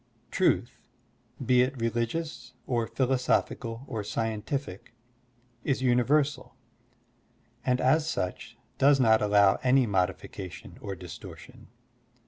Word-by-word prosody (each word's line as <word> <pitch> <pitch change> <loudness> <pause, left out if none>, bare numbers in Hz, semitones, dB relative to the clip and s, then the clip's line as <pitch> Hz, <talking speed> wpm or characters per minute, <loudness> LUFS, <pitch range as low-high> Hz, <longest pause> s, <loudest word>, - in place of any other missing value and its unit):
Truth, 155 -9 +1 0.7
be 125 0 +5
it 130 +1 -1
religious 120 +8 -2
or 120 -3 0
philosophical 125 -1 0
or 110 -6 -4
scientific, 110 +1 -4 0.7
is 135 -2 0
univer 130 +4 +4
sal, 150 -2 -10 1.1
and 125 -1 +1
as 150 +5 +3
such 90 - -4 0.2
does 140 0 +5
not 110 -3 +5
allow 100 -1 +4
any 130 0 +4
modification 95 -1 -3
or 100 -2 -5
distortion. 90 -1 -11
120 Hz, 105 wpm, -28 LUFS, 105-135 Hz, 1.1 s, be